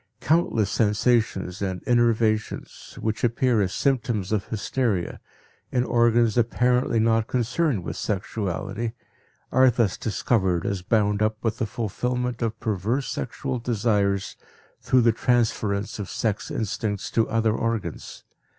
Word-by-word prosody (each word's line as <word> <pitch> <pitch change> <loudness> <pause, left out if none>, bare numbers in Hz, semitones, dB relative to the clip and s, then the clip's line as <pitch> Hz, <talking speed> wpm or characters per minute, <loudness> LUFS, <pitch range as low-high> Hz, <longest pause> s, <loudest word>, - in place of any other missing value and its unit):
Countless 130 - +1
sensations 105 -4 +1
and 95 -2 -3
innervations, 115 -2 0
which 110 0 -2
appear 120 -1 +2
as 95 -2 0
symptoms 120 -8 0
of 105 -3 0
hysteria, 110 -4 -1 0.5
in 125 - +2
organs 120 -2 +3
apparently 125 0 +2
not 115 0 +2
concerned 125 - 0
with - - -5
sexuality, 100 +2 -3 0.6
are 130 0 +6
thus 115 -5 +1
discovered 95 -5 0
as 100 -2 -1
bound 105 +1 +1
up 110 0 +1
with 115 0 -1
the 115 - 0
fulfillment 125 +3 -2
of 115 -1 -2
perverse 110 +4 -1
sexual 130 +1 -3
desires 105 -4 0 0.4
through 130 - +3
the 115 0 +5
transference 110 -4 0
of 100 - -5
sex 105 -3 -2
instincts 105 -1 -3
to 115 - +1
other 115 -1 +2
organs. 115 -9 -3
115 Hz, 125 wpm, -25 LUFS, 105-120 Hz, 0.6 s, are